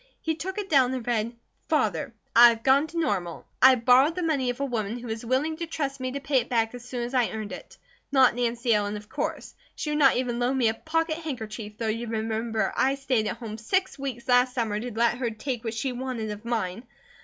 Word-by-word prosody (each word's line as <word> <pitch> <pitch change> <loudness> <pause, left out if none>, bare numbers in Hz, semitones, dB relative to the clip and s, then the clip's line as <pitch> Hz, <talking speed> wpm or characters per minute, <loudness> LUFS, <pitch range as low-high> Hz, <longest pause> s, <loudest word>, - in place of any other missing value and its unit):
He 320 - -1
took 375 +5 -5
it 410 -2 -3
down 260 -6 +3
and 250 -3 -5
read: 235 -1 -1 0.3
FATHER: 300 -3 +1 0.2
I 240 +1 +10
have 230 -1 -3
gone 275 +3 +4
to 335 - -8
Normal. 190 - -1 0.2
I 260 0 +8
borrowed 255 +6 +4
the 360 - -2
money 285 -6 +1
of 245 +1 -3
a 280 - 0
woman 230 -3 -2
who 245 - -9
was 220 0 -4
willing 270 +7 0
to 335 0 -4
trust 280 -4 -3
me 255 0 -3
to 280 - -3
pay 275 -1 +2
it - - -5
back 225 -2 +1
as 245 -1 -9
soon 245 -1 -4
as 240 +2 -5
I 250 -3 +2
earned 215 -1 -5
it. - - -10 0.3
Not 265 -2 +5
Nancy 235 -1 0
Ellen, 205 0 0
of 210 0 -12
course. - - -4 0.2
She 300 - -3
would 300 - 0
not 270 -4 +5
even 245 -1 -1
loan 250 +2 +1
me 240 -4 +3
a - - 0
pocket 320 +5 -1
handkerchief, 220 -8 -6
though 225 - -2
you 230 +2 -2
remember 225 0 -1
I 270 +1 +2
stayed 260 -6 0
at - - -3
home 220 -2 -7
six 375 - -1
weeks 265 -2 -5
last 250 0 +4
summer 220 -4 -1
to 245 +2 -5
let 235 +2 +1
her 245 -3 0
take 235 +2 -4
what 225 -1 -3
she 260 +4 -1
wanted 245 -3 -4
of 210 +2 -8
mine. 225 -1 -2
245 Hz, 240 wpm, -26 LUFS, 225-275 Hz, 0.3 s, I